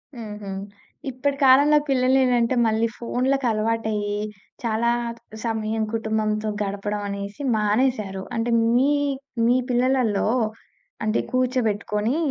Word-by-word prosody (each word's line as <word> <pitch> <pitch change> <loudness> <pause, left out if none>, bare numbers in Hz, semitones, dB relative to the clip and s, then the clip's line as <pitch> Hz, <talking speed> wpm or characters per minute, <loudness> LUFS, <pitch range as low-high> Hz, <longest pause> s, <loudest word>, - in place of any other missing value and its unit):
హుహు. 210 -3 -7 0.6
ఇప్పటి 275 +2 -2
కాలంలో 285 +3 +6
పిల్లలేంటంటే 255 -2 +3
మళ్ళీ 225 +1 +2
ఫోన్లకి 255 +3 0
అలవాటయ్యి. 215 -1 -1 0.5
చాలా 230 0 +1 0.5
సమయం 220 -1 -1
కుటుంబంతో 220 -1 -1
గడపడం 205 +1 -3
అనేసి 200 +4 -6
మానేశారు. 210 -2 0
అంటే 230 +1 0 0.2
మీ 265 +4 +4 0.5
మీ 240 +2 +4
పిల్లలల్లో 245 -4 +2 0.8
అంటే 215 +1 +1
కూర్చోబెట్టుకొని 235 -2 0
225 Hz, 95 wpm, -23 LUFS, 215-255 Hz, 0.8 s, కాలంలో